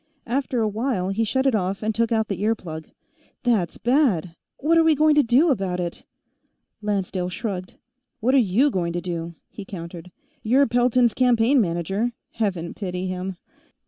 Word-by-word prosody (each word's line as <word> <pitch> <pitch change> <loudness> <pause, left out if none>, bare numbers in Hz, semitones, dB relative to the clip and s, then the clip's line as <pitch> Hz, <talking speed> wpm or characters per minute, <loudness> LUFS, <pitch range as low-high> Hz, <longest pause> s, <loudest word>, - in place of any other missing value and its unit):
After 255 0 -1
a 220 - +2
while, 210 -3 -1
he 205 +4 0
shut 260 +5 0
it 270 - +3
off 195 -1 -1
and 220 +1 0
took 230 +1 0
out 220 -1 +1
the 195 -2 -4
ear 220 +2 +2
plug. 160 -5 -8 0.5
"That's 220 -9 +1
bad! 230 - +1 0.2
What 330 +3 +3
are - - +5
we 320 -1 +4
going 305 +1 +4
to 295 - +5
do 275 +6 +4
about 190 -7 -1
it?" 175 -1 -4 0.8
Lancedale 195 -3 -2
shrugged. 185 -1 -5 0.4
"What 250 +3 +1
are 275 - +6 0.2
you 275 +5 +5
going 170 -4 -1
to 175 - -2
do?" 170 -2 -5
he 205 - -9
countered. 175 -2 -8 0.3
"You're 260 +6 +4
Pelton's 245 -1 +3
campaign 250 +1 +3
manager 195 +6 -1 0.2
Heaven 190 -7 -2
pity 180 -2 -4
him." 185 0 -4
215 Hz, 175 wpm, -23 LUFS, 180-245 Hz, 0.8 s, are